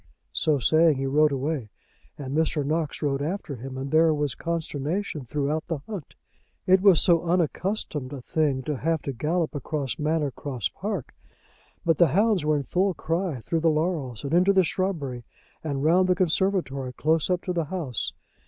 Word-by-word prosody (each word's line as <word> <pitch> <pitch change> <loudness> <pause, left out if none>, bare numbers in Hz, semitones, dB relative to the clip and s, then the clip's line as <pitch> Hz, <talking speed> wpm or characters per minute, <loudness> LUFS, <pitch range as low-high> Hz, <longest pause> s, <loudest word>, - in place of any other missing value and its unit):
So 155 -2 +2
saying, 155 +4 +4
he 135 - -2
rode 150 +2 +3
away, 140 -3 -2 0.5
and 140 -1 -5
Mr. 155 -2 +1
Knox 155 +1 -2
rode 140 -1 0
after 155 -3 -3
him, 130 +2 -7
and 135 +1 -4
there 160 0 +4
was 145 -2 -1
consternation 160 -1 -3
throughout 150 +5 -2
the 165 - -2
hunt. 200 -9 -7 0.5
It 185 0 +5
was 195 -5 +6
so 170 -3 +4
unaccustomed 170 -4 -1
a 140 - -6
thing 140 0 0
to 150 -1 -2
have 165 +3 -1
to 140 - -3
gallop 160 +6 -1
across 145 -1 -3
Manor 150 -1 0
Cross 130 -5 -3
Park! 195 - -5 0.7
But 165 -3 +2
the 170 - +7
hounds 210 -5 +3
were 150 0 +2
in 140 - -2
full 185 +6 0
cry, 165 -5 -2
through 165 +8 -1
the 165 +1 +3
laurels, 155 - -1
and 140 +2 -3
into 185 +3 +5
the 190 -1 +5
shrubbery, 155 -9 -2 0.4
and 140 -3 -2
round 180 +4 +4
the 180 - +4
conservatory, 170 -7 0
close 160 +5 +1
up 180 -1 0
to 180 - -2
the 170 -2 0
house. 150 - -2
155 Hz, 180 wpm, -26 LUFS, 140-175 Hz, 0.7 s, the